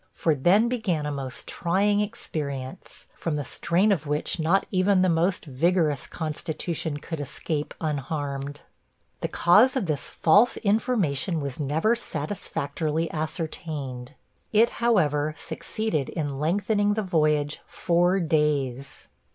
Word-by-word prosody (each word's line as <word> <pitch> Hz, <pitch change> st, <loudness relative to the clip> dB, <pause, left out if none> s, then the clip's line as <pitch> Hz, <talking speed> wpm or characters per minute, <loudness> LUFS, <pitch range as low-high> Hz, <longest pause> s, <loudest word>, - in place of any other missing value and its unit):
For 160 Hz, -, +2 dB
then 180 Hz, -, +4 dB
began 210 Hz, -11 st, -1 dB
a 150 Hz, -, -2 dB
most 135 Hz, -1 st, -5 dB
trying 200 Hz, +4 st, +1 dB
experience, 155 Hz, -, -5 dB
from 165 Hz, -3 st, -2 dB
the 145 Hz, -, -2 dB
strain 170 Hz, +9 st, +1 dB
of 155 Hz, -6 st, 0 dB
which 150 Hz, +4 st, -1 dB
not 170 Hz, +5 st, +2 dB
even 185 Hz, 0 st, +3 dB
the 185 Hz, -, +3 dB
most 175 Hz, +3 st, +1 dB
vigorous 155 Hz, 0 st, +1 dB
constitution 160 Hz, 0 st, -3 dB
could 160 Hz, +2 st, -6 dB
escape 145 Hz, +2 st, -3 dB
unharmed. 145 Hz, -1 st, -3 dB, 0.6 s
The -, -, -1 dB
cause 215 Hz, +10 st, +5 dB
of 255 Hz, -7 st, 0 dB
this 150 Hz, -4 st, -2 dB
false 205 Hz, +9 st, +4 dB
information 200 Hz, -, 0 dB
was 140 Hz, -2 st, -4 dB
never 160 Hz, -, +1 dB
satisfactorily 155 Hz, -4 st, -3 dB
ascertained. 155 Hz, -5 st, -4 dB, 0.4 s
It, 225 Hz, +2 st, +4 dB
however, 155 Hz, -10 st, +2 dB
succeeded 215 Hz, -11 st, -2 dB
in 145 Hz, -5 st, -3 dB
lengthening 205 Hz, +6 st, +1 dB
the 215 Hz, -, -1 dB
voyage 150 Hz, -5 st, +1 dB
four 175 Hz, +2 st, +2 dB
days. 150 Hz, -5 st, -1 dB
160 Hz, 125 wpm, -26 LUFS, 145-190 Hz, 0.6 s, cause